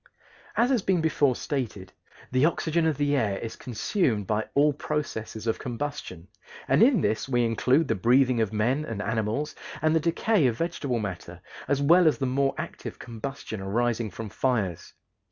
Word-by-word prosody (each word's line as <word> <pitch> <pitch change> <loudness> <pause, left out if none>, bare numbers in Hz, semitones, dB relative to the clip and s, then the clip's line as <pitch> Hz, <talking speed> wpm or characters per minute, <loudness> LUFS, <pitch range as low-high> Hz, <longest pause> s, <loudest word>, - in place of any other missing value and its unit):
As 245 +3 +3
has 250 -5 +2
been 190 -2 +1
before 150 -5 +2
stated, 110 -11 -4 0.4
the 130 +1 +2
oxygen 165 0 +2
of 155 -4 0
the 145 0 +1
air 105 -7 0
is 115 - -6
consumed 120 - -1
by 110 +2 -1
all 145 +1 +4
processes 125 -7 -4
of 115 - 0
combustion, 120 - -5 0.4
and 135 +3 +3
in 240 - +5
this 110 +5 -1
we 120 -2 +2
include 130 +7 +2
the - - +2
breathing 125 +3 +3
of 110 - 0
men 120 +7 +1
and 115 -8 -5
animals 110 +6 -1 0.3
and 155 0 +2
the - - +4
decay 170 +1 +2
of 115 -2 -1
vegetable 150 -6 -2
matter, 90 -5 -5 0.3
as 140 0 +1
well 170 +4 +6
as 155 - +3
the 135 - -1
more 135 +2 +1
active - - -6
combustion 115 -2 -6
arising 115 +3 0
from 110 +3 -7
fires. 105 -9 -1
125 Hz, 170 wpm, -26 LUFS, 110-150 Hz, 0.4 s, well